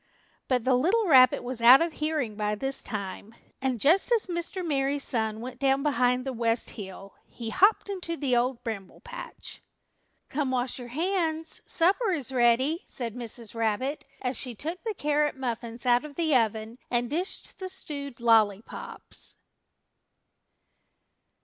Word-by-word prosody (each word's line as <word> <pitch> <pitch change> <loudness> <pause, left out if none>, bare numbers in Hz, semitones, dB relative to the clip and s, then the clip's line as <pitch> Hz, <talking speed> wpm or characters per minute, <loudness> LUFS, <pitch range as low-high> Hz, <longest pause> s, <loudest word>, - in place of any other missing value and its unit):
But 250 -3 +1
the 260 - +3
little 370 - +3
rabbit 255 -8 +6
was 245 -1 -4
out 245 +3 +9
of 335 -1 0
hearing 300 -9 -2
by 210 0 -1
this 270 +5 -2
time, 205 +1 -6 0.3
and 260 -3 -1
just 345 - +3
as 465 -3 +3
Mr. 350 +1 -4
Merry 280 -2 +1
Sun 220 -5 -1
went 250 +1 -7
down 270 0 +2
behind 250 -3 +2
the 265 - -3
West 230 -1 0
Hill, 195 -1 -9
he 230 -2 -7
hopped 400 - +4
into 360 -4 -3
the 265 -5 +1
Old 245 +1 0
Bramble 210 -5 -6
Patch. - - -9 0.7
"Come, 280 -1 -1
wash 255 0 -1
your 245 - -7
hands; 325 +2 -1
supper 390 +7 +3
is 275 -6 -3
ready," 260 +6 +3
said 235 -4 -3
Mrs. 235 -2 -6
Rabbit, 230 +6 -1 0.2
as 250 0 -1
she 250 -3 -2
took 330 - -5
the 440 -2 -3
carrot 295 -3 +1
muffins 235 -2 -4
out 245 +1 +4
of 300 -2 -9
the 320 -4 +2
oven 225 0 0
and 240 0 +1
dished 345 - -3
the 375 -1 -4
stewed 285 -8 -6
lollypops. 220 -3 0
260 Hz, 155 wpm, -27 LUFS, 235-315 Hz, 0.7 s, out